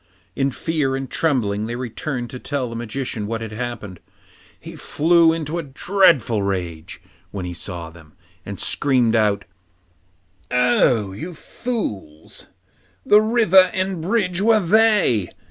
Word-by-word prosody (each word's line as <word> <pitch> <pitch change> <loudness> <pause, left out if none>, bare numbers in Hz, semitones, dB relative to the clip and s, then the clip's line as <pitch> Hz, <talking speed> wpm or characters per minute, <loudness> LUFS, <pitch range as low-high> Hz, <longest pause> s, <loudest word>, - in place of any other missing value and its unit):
In 135 0 +1
fear 145 -1 -2
and 135 0 -4
trembling 110 -9 0
they 120 - -4
returned 125 +1 -5
to 125 - -7
tell 140 -2 -3
the - - -6
Magician 115 -2 -4
what 115 +1 -4
had 110 -1 -6
happened. 110 -5 -6 0.6
He - - -10
flew 165 +1 +3
into 165 0 -3
a - - -1
dreadful 145 - +2
rage 90 -5 -4 0.3
when 95 -1 -6
he 90 - -5
saw 85 -1 -7
them, 80 -2 -17 0.3
and 100 -1 -8
screamed 125 -5 +3
out, 105 -2 +1 1.0
'Oh, 120 -4 +2
you 160 - -7
fools! 105 - -6 0.6
the 210 +1 +6
river 215 -5 +4
and 190 -2 -2
bridge 185 -1 0
were 220 +1 +4
they! 205 - +3
125 Hz, 135 wpm, -21 LUFS, 105-170 Hz, 1.0 s, the